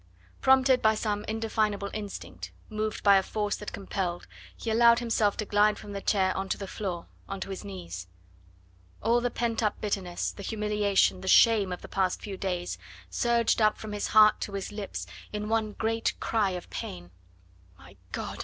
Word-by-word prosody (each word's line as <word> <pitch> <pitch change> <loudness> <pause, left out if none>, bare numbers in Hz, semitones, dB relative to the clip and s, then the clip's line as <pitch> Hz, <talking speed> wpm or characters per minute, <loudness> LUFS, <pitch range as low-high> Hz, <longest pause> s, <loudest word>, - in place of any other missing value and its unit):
Prompted 265 -1 +5
by 220 0 +4
some 210 -1 -1
indefinable 215 -2 -1
instinct, 205 -2 -6 0.2
moved 215 0 -3
by 200 -1 +7
a - - +4
force 210 +1 -2
that 210 - -7
compelled, 185 -3 -3 0.3
he 225 - -3
allowed 235 +1 +6
himself 225 -4 +1
to 215 - -2
glide 210 +1 +3
from 205 - -9
the 200 -1 -4
chair 190 -2 +2
on 195 0 -3
to - - 0
the 200 - -5
floor, 185 -3 -4 0.2
on 195 0 -4
to 195 - -5
his 190 - -6
knees. 90 -2 -7 1.0
All 235 +2 +3
the 245 - +1
pent 235 -1 -1
up 210 -2 0
bitterness, 195 -4 -2
the - - -10
humiliation, 210 -3 +1
the 190 - -7
shame 210 -1 +6
of 180 - -5
the - - -7
past 190 -2 0
few 200 -2 -6
days, 180 - -3 0.3
surged 235 - +2
up 215 0 +4
from 215 - -7
his 205 -1 -2
heart 215 0 +6
to 200 - -4
his 195 0 -4
lips 200 - -5 0.3
in 210 0 -4
one 220 -2 0
great 225 +1 -1
cry 215 -3 +1
of 180 -1 -6
pain. 90 0 -6 0.7
"My 100 +3 -16 0.2
God!" - - -5
210 Hz, 185 wpm, -28 LUFS, 190-220 Hz, 1.0 s, by